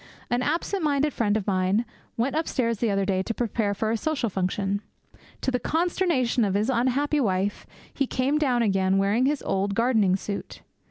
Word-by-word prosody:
An 245 +1 +2
absent 335 +8 -1
minded 295 -1 +1
friend 215 -2 +1
of 205 - -4
mine 190 +3 +1 0.3
went 255 +5 0
upstairs 250 -8 0
the 235 - +1
other 195 -1 +1
day 190 -1 +1
to 230 +4 -3
prepare 220 -3 -1
for 220 +2 -1
a 230 - +1
social 270 -4 -1
function. 195 +2 -1 0.6
To 260 - 0
the 250 - 0
consternation 325 -8 +1
of 195 -2 0
his 215 +6 +1
unhappy 260 +5 +1
wife 200 -4 -1 0.3
he 275 - 0
came 270 +5 0
down 250 -5 +2
again 195 -2 +2
wearing 205 +6 +2
his 290 0 -1
old 195 +1 -1
gardening 225 -5 +3
suit. 200 +1 -6
230 Hz, 180 wpm, -25 LUFS, 200-270 Hz, 0.6 s, gardening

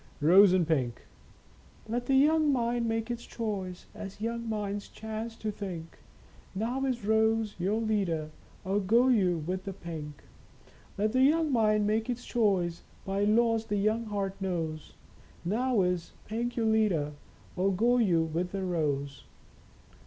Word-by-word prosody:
Rose 180 +6 +7
and 180 -3 +2
Pink. 130 -7 +1 0.9
ft - - -19
Let 240 +1 -1
the 270 - +3
young 305 +2 +4
mind 240 -2 0
make 225 +1 -1
its 240 0 -4
choice, 195 -6 -4
As 205 -2 -8
young 230 +1 -3
minds 205 -2 -3
chance 220 +1 -6
to 215 -1 -3
think; 180 -6 -7 0.6
Now 240 +7 -1
is 245 -5 -2
Rose 220 0 +2
your 200 +5 0
leader, 190 -9 -1 0.3
Or 195 +2 +1
go 230 +6 +3
you 180 -9 +2
with 185 +2 -3
the 195 - -4
Pink? 155 -5 -8 0.7
Let 215 +2 +1
the 255 +2 +2
young 310 +3 +4
mind 215 -3 +3
make 220 +3 0
its 245 0 -3
choice 190 -7 +1 0.2
By 195 +1 0
laws 225 +1 +2
the 205 - 0
young 215 +3 +1
heart 200 -2 -2
knows. 165 -5 -3 0.5
Now 230 +2 +1
is 180 -2 -2
Pink 235 +3 -3
your 230 - 0
leader 210 -10 +2 0.4
Or 190 +2 +2
go 235 +6 +3
you 175 -8 +3
with 170 +3 -3
the 195 -1 -2
Rose 145 -6 -2
210 Hz, 155 wpm, -29 LUFS, 180-230 Hz, 0.9 s, Rose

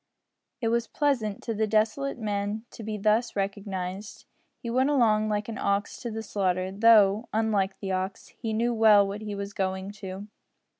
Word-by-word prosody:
It 225 - +1
was 235 0 0
pleasant 245 -9 -1
to 230 - -2
the 220 0 0
desolate 220 +7 +1
man 210 0 -2
to - - -10
be 215 -1 -4
thus 215 +3 +1
recognised. 195 -1 -4 0.3
He - - -9
went 260 +3 +2
along 215 -6 +3
like 210 -1 -1
an 225 -2 -5
ox 200 +1 -1
to 240 - -4
the 220 0 -5
slaughter, 185 -3 -1
though, 210 0 +5
unlike 210 -3 +1
the 195 -2 -4
ox, 190 +1 -3
he 225 -2 -5
knew 235 +2 +1
well 215 -3 +6
what 200 +2 -5
he 210 -1 -5
was 200 0 -5
going 190 0 -2
to. 190 +1 -6
210 Hz, 180 wpm, -27 LUFS, 200-225 Hz, 0.3 s, well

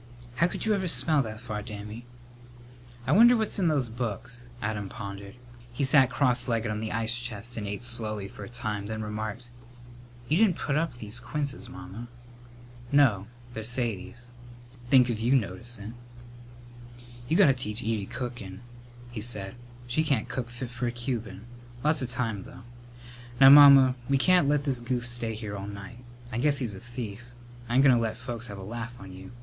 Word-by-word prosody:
"How 170 - +4
could - - -5
you 220 - +3
ever 190 -2 -1
smell 155 -3 +7
that 110 -3 -6
far, 110 -3 -5
Dammy?" 105 +2 -8 1.0
"I 130 - 0
wonder 235 +8 +7
what's 220 -2 -1
in 180 - +2
those 145 -6 +1
books?" 120 +1 -5
Adam 105 -2 -3
pondered. 100 -2 -8 0.4
He 120 +4 -3
sat 135 -1 +5
cross 125 -2 +1
legged 115 -2 0
on 105 - -3
the 110 0 -4
ice 115 +2 -1
chest 120 -1 -6
and 105 -2 -4
ate 100 +3 -5
slowly 110 -4 -2
for 100 - -10
a 100 - -9
time, 105 -4 -3
then 110 0 -4
remarked, 110 +3 -5 0.8
"You 155 - +2
didn't 205 -4 +4
put 145 - -2
up 160 -4 0
these 110 0 -4
quinces, 135 +3 -4
Mamma." 95 +6 -9 0.8
"No; 120 -9 +4 0.3
they're 110 - -5
Sadie's. 120 0 -3 0.6
Think 125 -2 +6
of 110 - -3
your 120 +4 +2
noticin'!" 115 -2 -2 1.4
"You 165 - +3
got 200 - +7
to 140 - +5
teach 120 -2 -4
Edie 110 -3 -2
cookin'," 120 -6 -6 0.5
he 115 -3 -5
said. 105 -4 -3 0.3
"She 125 +6 0
can't 135 -8 0
cook 125 -1 -4
fit 120 +1 -7
for 125 0 -3
a - - -1
Cuban. 115 -4 -5 0.4
Lots 150 -1 +2
of 125 - -2
time, 115 -5 -2
though. 130 +6 -12 0.8
Now, 135 0 +10
Mamma, 140 -3 +9 0.2
we 140 - +4
can't 175 0 +4
let 145 -1 +2
this 135 -4 -1
goof 120 0 -2
stay 120 -2 -3
here 105 -2 -6
all 100 0 -6
night. 100 +2 -9 0.3
I 120 - -2
guess 145 +2 +2
he's 120 -6 -3
a 95 - -8
thief. 120 -2 -7 0.5
I 120 - -1
ain't 135 - +6
goin' 135 -2 +7
to 120 - +1
let 110 -1 -1
the - - -18
folks 120 -1 -6
have 100 -3 -8
a 95 - -8
laugh 120 +4 -6
on 95 -1 -10
you. 95 0 -11
120 Hz, 190 wpm, -27 LUFS, 105-130 Hz, 1.4 s, Now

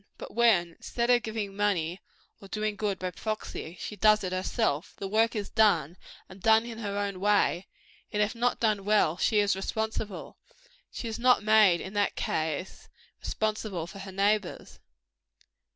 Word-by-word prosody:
But - - -9
when, 220 -7 +4
instead 235 +8 -2
of 245 -1 +4
giving 220 -3 -4
money 190 -4 0 0.4
or 195 - -11
doing 215 +1 -2
good 205 -1 -2
by 185 0 -4
proxy, 185 -4 -5
she 210 - -6
does 215 0 +4
it 185 - -3
herself, 185 - -1
the 195 - -4
work 225 +3 +2
is 205 -2 -4
done, 175 -8 +3 0.3
and 190 0 -14
done 220 +3 +4
in 230 -1 -7
her 200 -2 -3
own 200 -2 -2
way: 200 -2 +2 0.4
and 210 - -2
if 210 +3 +1
not 245 +1 0
done 215 -3 +1
well, 205 -5 +2
she 215 - +1
is 205 -1 +3
responsible. 220 +1 -4 0.5
She 235 - -6
is 225 0 -5
not 250 -2 +4
made, 210 -5 +5
in 190 - -7
that 205 -1 0
case, 160 +2 -3 0.3
responsible 215 -5 -2
for 175 +3 -11
her 195 0 -8
neighbors. 200 0 -1
205 Hz, 170 wpm, -28 LUFS, 190-220 Hz, 0.5 s, made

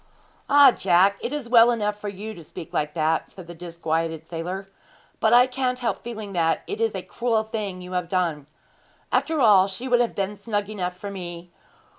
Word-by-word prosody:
'Ah, 285 -2 +8
Jack, 195 0 +3
it - - -3
is 290 -4 -4
well 235 0 +7
enough 210 -3 -1
for 210 - -3
you 205 +3 -7
to 170 - -11
speak 155 - -10
like 150 +1 -1
that,' 160 0 0
said 185 - -11
the 175 - -9
disquieted 165 -1 -3
sailor; 175 +4 -5 0.5
'but 220 - +3
I 245 +1 +7
can't 255 0 -1
help 245 -2 -2
feeling 220 -4 -6
that 165 -2 +1
it 415 +2 -5
is 455 - +1
a - - -4
cruel 230 -2 0
thing 205 -4 -5
you 180 - -9
have 180 -2 -2
done. 165 -6 -1 0.6
After 320 -1 +1
all, 205 -6 +6
she 200 +7 -5
would 245 -1 +3
have 240 - -1
been 200 +1 -2
snug 205 0 -3
enough 180 -3 -4
for 200 +2 -6
me. 175 -2 -7
200 Hz, 200 wpm, -24 LUFS, 175-235 Hz, 0.6 s, Ah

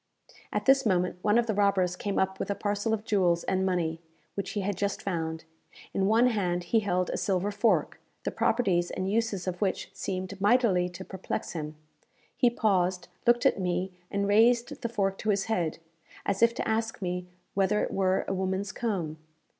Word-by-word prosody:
At - - -2
this 270 0 +5
moment 180 -3 +1
one 210 +3 +3
of 240 - +3
the 220 - 0
robbers 195 -3 +2
came 200 +2 -3
up 190 0 0
with - - -3
a 200 - 0
parcel 205 +2 -1
of 220 -1 0
jewels 180 -6 +2
and 190 0 0
money, 170 -3 0 0.3
which 200 -2 -4
he 205 - -1
had 200 +1 -1
just 200 +2 -1
found. 160 -4 -2 0.5
In 195 0 +1
one 225 +3 +5
hand 180 -6 0
he 225 - +2
held 185 -4 0
a - - -2
silver 195 +1 0
fork, 210 +3 +1 0.2
the - - -1
properties 185 -7 +1
and 185 +1 -2
uses 220 -4 0
of 180 -1 -4
which 195 -1 -1
seemed 190 0 -4
mightily 205 -5 +3
to 180 +1 -9
perplex 190 -1 -4
him. 155 -2 -5 0.6
He 245 - +4
paused, 185 -6 +1 0.2
looked 240 0 +4
at - - +4
me, 180 +1 -1 0.2
and 200 0 -1
raised 235 +3 +3
the 235 - -2
fork 195 -4 -1
to 215 - -2
his 200 -1 +2
head, 175 -8 -1 0.5
as 200 0 -1
if 230 0 +5
to - - -2
ask 225 -1 -1
me 180 0 -3 0.3
whether 200 +2 +2
it - - -3
were 190 -1 +1
a - - -1
woman's 190 +1 -1
comb. 175 -10 -3
195 Hz, 195 wpm, -28 LUFS, 180-215 Hz, 0.6 s, this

